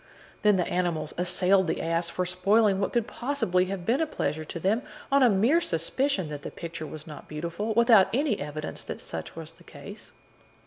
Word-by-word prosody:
Then 210 Hz, -1 st, +5 dB
the 180 Hz, -, +1 dB
animals 170 Hz, -4 st, -1 dB
assailed 180 Hz, +1 st, +3 dB
the -, -, -1 dB
ass 165 Hz, +1 st, -1 dB
for 180 Hz, +2 st, -2 dB
spoiling 195 Hz, +3 st, +3 dB
what -, -, 0 dB
could 235 Hz, -3 st, +1 dB
possibly 235 Hz, -10 st, 0 dB
have 185 Hz, -2 st, -5 dB
been 250 Hz, -, +2 dB
a 320 Hz, -, +1 dB
pleasure 155 Hz, -, -2 dB
to 165 Hz, +2 st, -7 dB
them, 200 Hz, +8 st, +1 dB, 0.3 s
on 280 Hz, 0 st, +5 dB
a 250 Hz, -, +6 dB
mere 230 Hz, -, +3 dB
suspicion 190 Hz, -, -1 dB
that 145 Hz, -1 st, -6 dB
the -, -, -6 dB
picture 165 Hz, -2 st, -7 dB
was 155 Hz, 0 st, -9 dB
not 150 Hz, -3 st, -10 dB
beautiful, 170 Hz, +8 st, -3 dB
without 230 Hz, -4 st, +6 dB
any 260 Hz, -3 st, +1 dB
evidence 150 Hz, +1 st, -5 dB
that -, -, -6 dB
such 80 Hz, -, -6 dB
was 165 Hz, -1 st, -8 dB
the 170 Hz, +1 st, -21 dB
case. 175 Hz, +8 st, -11 dB
180 Hz, 195 wpm, -27 LUFS, 165-220 Hz, 0.3 s, a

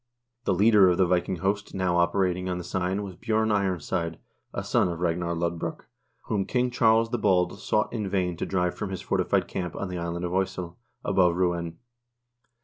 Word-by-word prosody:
The 95 Hz, -, +2 dB
leader 100 Hz, -1 st, +6 dB
of 90 Hz, -, +2 dB
the 95 Hz, -, +4 dB
Viking 90 Hz, +1 st, +1 dB
host 100 Hz, +1 st, -1 dB
now 95 Hz, -2 st, +1 dB
operating 90 Hz, +1 st, +1 dB
on 90 Hz, -, -1 dB
the 90 Hz, -, -5 dB
Seine 95 Hz, +2 st, -1 dB
was 95 Hz, -3 st, -7 dB
Bj0rn 110 Hz, +1 st, +1 dB
Ironside, 90 Hz, -4 st, -1 dB, 0.3 s
a -, -, -4 dB
son -, -, +2 dB
of 85 Hz, -1 st, -4 dB
Ragnar 85 Hz, 0 st, 0 dB
Lodbrok, 85 Hz, 0 st, -3 dB, 0.4 s
whom 105 Hz, -3 st, -1 dB
King 125 Hz, +4 st, 0 dB
Charles 115 Hz, -1 st, +3 dB
the 120 Hz, -, 0 dB
Bald 90 Hz, 0 st, +2 dB
sought 105 Hz, 0 st, 0 dB
in 105 Hz, -4 st, -2 dB
vain 90 Hz, -2 st, 0 dB
to -, -, -2 dB
drive 90 Hz, -2 st, 0 dB
from 105 Hz, -, -4 dB
his 95 Hz, -2 st, -5 dB
forti -, -, 0 dB
fied -, -, +1 dB
camp 90 Hz, -2 st, -4 dB
on 100 Hz, -, -4 dB
the 90 Hz, -1 st, -4 dB
island 85 Hz, +1 st, -3 dB
of 85 Hz, -, -3 dB
Oissel, 95 Hz, -2 st, -2 dB, 0.3 s
above 90 Hz, -3 st, +3 dB
Rouen. 85 Hz, -2 st, -1 dB
90 Hz, 195 wpm, -26 LUFS, 85-100 Hz, 0.4 s, leader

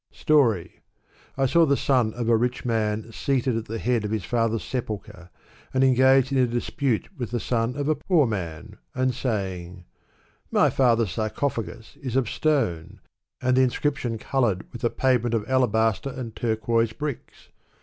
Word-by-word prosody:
Storv. 125 Hz, -, +2 dB, 0.7 s
I 135 Hz, -, +2 dB
saw 165 Hz, +6 st, +4 dB
the 140 Hz, -1 st, +3 dB
son 125 Hz, -5 st, +2 dB
of 120 Hz, -2 st, -3 dB
a 115 Hz, -, +5 dB
rich 125 Hz, +3 st, -1 dB
man 110 Hz, -1 st, -1 dB
seated 130 Hz, 0 st, 0 dB
at 115 Hz, -1 st, -3 dB
the 115 Hz, +1 st, -5 dB
head 120 Hz, 0 st, 0 dB
of 105 Hz, -, -2 dB
his 110 Hz, -3 st, -2 dB
father's 115 Hz, +1 st, 0 dB
sepulchre, 105 Hz, -7 st, -5 dB, 0.5 s
and 130 Hz, -, +4 dB
engaged 130 Hz, +1 st, +4 dB
in 135 Hz, -, +2 dB
a 125 Hz, -, +4 dB
dispute 120 Hz, +1 st, -1 dB
with 120 Hz, -, -3 dB
the 120 Hz, -, -2 dB
son 115 Hz, +2 st, -1 dB
of 145 Hz, 0 st, -2 dB
a 155 Hz, -, +4 dB
poor 155 Hz, +1 st, +2 dB
man, 85 Hz, -8 st, -5 dB, 0.2 s
and 130 Hz, 0 st, +1 dB
saying, 95 Hz, -8 st, -4 dB, 0.6 s
My -, -, +3 dB
father's 115 Hz, -6 st, +2 dB
sar 110 Hz, +4 st, -2 dB
cophagus 115 Hz, -5 st, -4 dB
is 130 Hz, -3 st, -5 dB
of 130 Hz, -4 st, +1 dB
stone, 100 Hz, -, -1 dB, 0.4 s
and 130 Hz, 0 st, +3 dB
the 130 Hz, -, +5 dB
inscription 130 Hz, -2 st, 0 dB
colored 115 Hz, -6 st, 0 dB
with 120 Hz, -, -9 dB
a 120 Hz, -, +3 dB
pavement 120 Hz, -3 st, +1 dB
of 110 Hz, -1 st, -2 dB
alabaster 115 Hz, -2 st, +1 dB
and 125 Hz, -4 st, -7 dB
turquoise 115 Hz, 0 st, 0 dB
bricks. 145 Hz, 0 st, -6 dB
120 Hz, 170 wpm, -25 LUFS, 110-130 Hz, 0.7 s, a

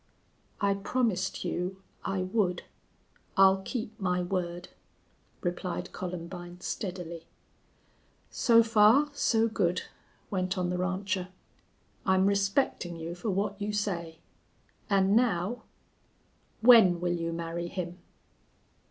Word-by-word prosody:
"I 200 Hz, -1 st, +2 dB
promised 195 Hz, -3 st, -1 dB
you 180 Hz, +2 st, -3 dB, 0.2 s
I 190 Hz, -1 st, -1 dB
would. 185 Hz, -2 st, 0 dB, 0.7 s
I'll 190 Hz, 0 st, +6 dB
keep 220 Hz, 0 st, -5 dB
my 180 Hz, -2 st, 0 dB
word," 175 Hz, -1 st, -3 dB, 0.7 s
replied 175 Hz, 0 st, -3 dB
Columbine, 175 Hz, 0 st, -6 dB
steadily. 175 Hz, -4 st, -5 dB, 1.0 s
"So 230 Hz, -1 st, +5 dB
far 225 Hz, +6 st, +5 dB
so 225 Hz, -5 st, +2 dB
good," 180 Hz, -5 st, 0 dB, 0.5 s
went 185 Hz, 0 st, -1 dB
on 180 Hz, -1 st, 0 dB
the 180 Hz, -, -2 dB
rancher. 185 Hz, 0 st, -1 dB, 0.8 s
"I'm 190 Hz, 0 st, +3 dB
respectin' 200 Hz, -2 st, +1 dB
you 165 Hz, +1 st, -5 dB
fer 175 Hz, +5 st, -4 dB
what 200 Hz, +1 st, -1 dB
you 205 Hz, +1 st, -2 dB
say.... 170 Hz, -6 st, -2 dB, 0.7 s
An' 195 Hz, 0 st, +3 dB
now, 225 Hz, -1 st, +1 dB, 1.0 s
when 225 Hz, -7 st, +7 dB
will 175 Hz, 0 st, 0 dB
you 165 Hz, -1 st, -2 dB
marry 170 Hz, +1 st, -4 dB
him?" 175 Hz, 0 st, -5 dB
185 Hz, 110 wpm, -29 LUFS, 175-205 Hz, 1.0 s, when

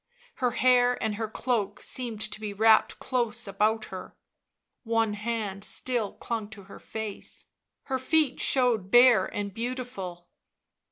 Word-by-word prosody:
Her 250 Hz, -, +1 dB
hair 250 Hz, 0 st, +3 dB
and 220 Hz, -2 st, -1 dB
her 220 Hz, +1 st, -3 dB
cloak 220 Hz, -2 st, -2 dB
seemed 235 Hz, -4 st, -1 dB
to 215 Hz, 0 st, 0 dB
be 210 Hz, -2 st, -5 dB
wrapped 220 Hz, +1 st, +4 dB
close 240 Hz, -5 st, -2 dB
about 215 Hz, +3 st, +1 dB
her; 185 Hz, -, -8 dB, 0.7 s
one 225 Hz, -2 st, +1 dB
hand 210 Hz, -2 st, -3 dB
still 235 Hz, -4 st, -1 dB
clung 225 Hz, -3 st, -4 dB
to 215 Hz, -2 st, -11 dB
her 195 Hz, -, -12 dB
face; 220 Hz, -2 st, -5 dB, 0.4 s
her 265 Hz, -1 st, -2 dB
feet 300 Hz, 0 st, +1 dB
showed 240 Hz, -7 st, +2 dB
bare 240 Hz, -4 st, +6 dB
and 200 Hz, -1 st, -4 dB
beautiful. 225 Hz, -8 st, -5 dB
220 Hz, 135 wpm, -27 LUFS, 205-245 Hz, 0.7 s, bare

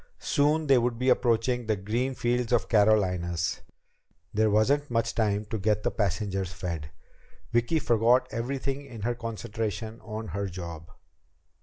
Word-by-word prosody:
Soon 150 Hz, +2 st, +1 dB
they 135 Hz, -3 st, +5 dB
would 120 Hz, 0 st, 0 dB
be 130 Hz, +2 st, +1 dB
approaching 125 Hz, -1 st, +2 dB
the 110 Hz, -, +2 dB
green 115 Hz, +7 st, -2 dB
fields 120 Hz, 0 st, 0 dB
of 120 Hz, -, +4 dB
the -, -, -19 dB
Carolinas. 90 Hz, -6 st, +2 dB, 0.7 s
There 110 Hz, +1 st, +3 dB
wasn't 135 Hz, +8 st, +2 dB
much 115 Hz, -1 st, 0 dB
time 105 Hz, -2 st, 0 dB
to 110 Hz, -, -1 dB
get 105 Hz, +1 st, +1 dB
the -, -, +1 dB
passengers 95 Hz, -2 st, -1 dB
fed. 85 Hz, -5 st, -5 dB, 0.6 s
Vicki 120 Hz, +7 st, +2 dB
forgot 125 Hz, -2 st, +3 dB
everything 135 Hz, +3 st, -3 dB
in 115 Hz, -5 st, -9 dB
her 120 Hz, +2 st, +1 dB
concentration 115 Hz, -1 st, -4 dB
on 110 Hz, -1 st, -6 dB
her 100 Hz, +4 st, -2 dB
job. 85 Hz, -3 st, -7 dB
115 Hz, 150 wpm, -28 LUFS, 100-125 Hz, 0.7 s, they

